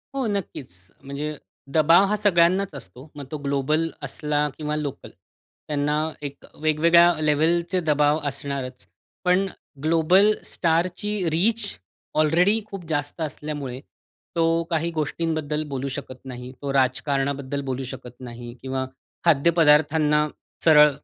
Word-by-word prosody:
हो, 270 -2 0
नक्कीच 190 - -4 0.3
म्हणजे 145 +2 -4 0.4
दबाव 165 +5 +6
हा 210 - +1
सगळ्यांनाच 190 -2 +3
असतो. 130 - -10
मग 145 -1 -7
तो 155 - -3
ग्लोबल 145 +4 +1
असला 150 +2 0
किंवा 150 -1 -2
लोकल. 150 -3 -5 0.6
त्यांना 150 0 0 0.3
एक 140 -1 -7 0.2
वेगवेगळ्या 170 +3 +5
लेव्हलचे 165 +4 +2
दबाव 150 -1 +3
असणारच. 135 -2 -4 0.4
पण 180 +2 +3 0.4
ग्लोबल 165 +6 +5
स्टारची 175 +5 0
रीच 210 +8 +1 0.6
ऑलरेडी 180 +8 +3
खूप 195 -5 -8
जास्त 145 +1 -2
असल्यामुळे 145 -4 -4 0.6
तो 165 0 +2
काही 170 0 0
गोष्टींबद्दल 155 -1 -2
बोलू 135 0 -3
शकत 130 -2 -8
नाही. 125 -1 -7
तो 140 -1 -3
राजकारणाबद्दल 135 +1 0
बोलू 130 0 -3
शकत 125 -2 -10
नाही 120 -1 -8
किंवा 130 0 -2 0.4
खाद्यपदार्थांना 150 -1 +4 0.4
सरळ 150 -2 +8
150 Hz, 115 wpm, -24 LUFS, 140-170 Hz, 0.6 s, सरळ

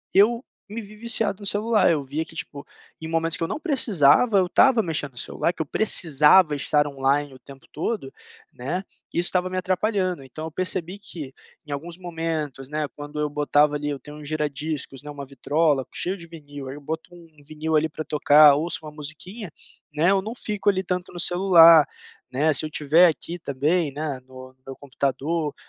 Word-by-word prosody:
eu 230 +5 +4 0.3
me 225 +3 -5
vi 210 0 -13
viciado 220 -3 -2
no 205 - -10
celular, 215 +3 +2
eu 155 -4 +1
via 145 +4 -4
que - - -14
tipo, 140 -1 -6 0.4
em 160 - -6
momentos 165 0 0
que - - -3
eu - - -1
não - - -4
precisava, 225 - +3
eu 185 - +1
estava 240 +4 +4
mexendo 150 -5 -4
celular, 170 - -1
que - - -6
eu - - -2
precisava 155 -2 +4
estar 145 +1 +1
online 140 0 -1
o 130 - -14
tempo 135 +1 -15
todo, 155 -4 -4 0.4
né, 155 +10 -4 0.3
e - - 0
isso 175 - +1
estava 185 0 0
me 185 - -4
atrapalhando, 185 -2 -1
então 145 +4 -9
eu 160 - -6
percebi 185 +2 -3
que 170 -9 -8 0.3
em 150 - -10
alguns 165 +5 -6
momentos 160 -6 -4
né 150 +1 -2
quando 145 0 -8
eu 150 - -1
botava 150 0 +2
ali 145 0 -3
eu 145 - -3
tenho 150 +3 -12
um 150 - -11
gira-discos, 150 -2 -4
né, 150 - -10
uma 145 -1 -7
vitrola 140 +1 0
cheio 185 +3 -2
de 170 -2 -11
vinil, 145 -4 -10
aí 130 - -7
eu 145 - -11
boto 160 +4 -6
um 165 -3 -18
vinil 155 +2 -2
ali 155 +1 +1
para 155 0 -7
tocar, 150 -1 +6
ouço 160 +4 -1
uma 150 - -8
musiquinha, 160 +8 -8 0.4
né, 160 +5 +3
eu 195 -1 +2
não 220 +4 -6
fico 210 -4 -1
ali 190 -1 0
tanto 180 0 -4
no 175 - -7
celular, 170 -4 +6 0.4
né, 150 +5 +1
se 150 +1 +4
eu - - -2
estiver 155 +4 +4
aqui 170 +2 -3
também, 150 +2 -1
né, 145 -2 -4
no 130 0 -11
no 130 - -35
meu 135 - -8
computador, 145 +3 -2
155 Hz, 200 wpm, -23 LUFS, 145-180 Hz, 0.4 s, tocar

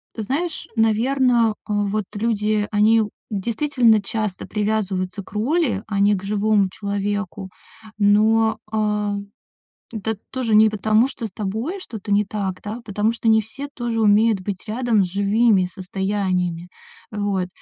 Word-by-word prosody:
знаешь, 280 - -3
наверно, 230 +1 +3
а 210 - -3
вот 205 +1 -1
люди, 210 -1 0
они 215 +2 +4
у 210 - -2 0.2
действительно 230 +2 +2
часто 210 -1 -3
привязываются 205 -3 -1
к - - -17
роли, 230 - 0
а 200 -2 -2
не 205 +1 +4
к 190 - -6
живому 205 -1 +2
человеку. 200 -1 -3 0.5
Но, 215 +2 +3
а, 210 -1 0 0.8
это 220 0 -3
тоже 250 -4 -1
не 215 +1 +6
потому, 215 +3 +2
что 250 -4 -5
с 210 - -11
тобой 220 - -3
что-то 215 - -6
не 205 +1 +4
так, 195 -2 -4
да, 210 +2 -5
а - - -14
потому 210 0 0
что 230 - -6
не 220 0 +5
все 275 +7 -8
тоже 235 -2 -2
умеют 210 0 +4
быть 195 +2 -6
рядом 230 -2 +1
с - - -4
живыми 200 +1 +3
состояниями. 185 -2 -2 0.4
Вот, 205 -3 -1
210 Hz, 145 wpm, -21 LUFS, 200-225 Hz, 0.8 s, не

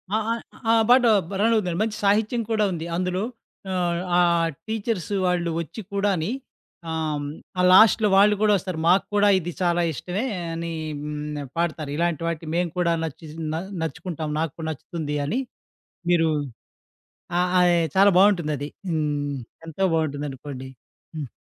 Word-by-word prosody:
ఆ! - - +4
ఆ! - - +2 0.4
ఆహ్, 225 -1 +5
పాట 250 +1 +7 0.3
బ - - -10
రన్నవుతుందండి. 210 -6 +2
మంచి 215 -1 -3
సాహిత్యం 215 +4 +2
కూడా 215 -1 +2
ఉంది 165 -2 -4
అందులో. 180 +2 -1 0.5
ఆహ్, 175 -2 0 0.2
ఆహ్, 170 -1 +3 0.2
టీచర్స్ 220 -4 -2
వాళ్ళు 175 -1 +1
వచ్చి 170 +6 -6
కూడాని. 200 -4 +1 0.6
ఆహ్, 155 -2 -2 0.3
ఆ - - +4
లాస్ట్‌లో 220 +2 +7
వాళ్ళు 210 +1 +6
కూడా 215 -1 +4
వస్తారు. 185 -3 -5
మాకు 185 +3 +4
కూడా 205 0 +5
ఇది 175 0 -5
చాలా 175 -1 +2
ఇష్టమే 185 - -3 0.3
అని 165 0 -4 0.3
హ్మ్. 150 0 -4 0.2
పాడతారు. 160 -3 -1
ఇలాంటి 170 -2 0
వాటికి 165 -1 -3
మేము 175 -1 0
కూడా 170 -1 +2
నచ్చి 160 +1 -6
స్ - - -11 0.2
న - - -1 0.3
నచ్చుకుంటాం. 160 0 -4
నాకు 160 -3 -1
కూడా 160 -1 -5
నచ్చుతుంది 150 0 -4
అని. 220 - -1 0.7
మీరు 165 -2 +4 1.1
ఆహ్, 180 0 +2
ఆహ్, 175 -1 +5 0.2
చాలా 200 +1 +7
బావుంటుందది. 160 -8 +3 0.2
హ్మ్. 145 -3 -1 0.3
ఎంతో 165 +3 -5
బావుంటుందనుకోండి. 145 -3 -3 0.5
హ్మ్. 145 -4 -4
170 Hz, 145 wpm, -24 LUFS, 155-195 Hz, 1.1 s, పాట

